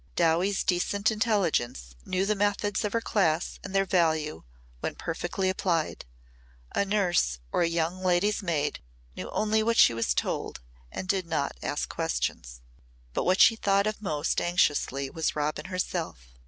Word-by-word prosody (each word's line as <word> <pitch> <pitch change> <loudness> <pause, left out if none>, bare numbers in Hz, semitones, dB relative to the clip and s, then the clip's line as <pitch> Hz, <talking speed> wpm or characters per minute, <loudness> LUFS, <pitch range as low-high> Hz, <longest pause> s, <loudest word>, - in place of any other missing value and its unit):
Dowie's 175 +4 +2
decent 200 +4 +1
intelligence 180 - 0
knew 185 +1 0
the 215 - +2
methods 205 0 0
of 210 - -1
her 230 - +1
class 175 -7 0
and 195 0 -6
their 195 0 +3
value 160 - +1 0.4
when - - -3
perfectly 175 +3 -2
applied. 175 -4 -1 0.7
A - - +2
nurse 185 - +1
or - - +1
a 170 - +3
young 170 +2 -1
lady's 185 +4 +2
maid 160 -6 -1 0.4
knew - - -6
only 215 +1 +1
what 230 +1 +1
she - - +7
was 115 0 0
told - - -2 0.3
and 185 - -5
did 185 -1 0
not 155 -4 -1
ask - - -2
questions. - - -3 0.5
But - - -1
what 185 +2 +3
she 225 - +7
thought 200 -2 +2
of 215 0 -2
most 155 -6 -1
anxiously 145 -6 +1
was 160 -1 -1
Robin 150 +3 -2
herself. 120 - -4
180 Hz, 155 wpm, -28 LUFS, 155-200 Hz, 0.7 s, she